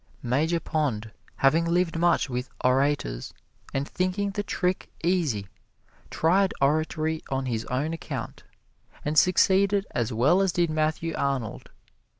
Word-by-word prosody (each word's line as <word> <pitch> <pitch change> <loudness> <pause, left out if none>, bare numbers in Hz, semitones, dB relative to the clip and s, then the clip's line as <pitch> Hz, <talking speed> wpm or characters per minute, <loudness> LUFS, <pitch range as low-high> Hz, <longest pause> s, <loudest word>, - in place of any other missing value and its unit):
Major 150 +8 +1
Pond, 130 -11 -2 0.2
having 150 +5 +3
lived 170 0 +1
much 170 -2 +2
with 125 0 -4
orators, 130 - 0 0.4
and 135 +1 -2
thinking 185 +2 -1
the 205 +1 -2
trick 185 -2 -2
easy, 160 - +1 0.6
tried 190 +4 +2
oratory 155 +2 +1
on 135 0 -1
his 115 -3 -2
own 145 +6 -1
account, 165 - -6 0.6
and 150 +1 -1
succeeded 195 +4 +4
as 120 -1 -1
well 135 - +3
as 190 -3 +1
did 170 -2 +1
Matthew 155 +1 -1
Arnold. 135 -5 -2
155 Hz, 130 wpm, -26 LUFS, 135-175 Hz, 0.6 s, succeeded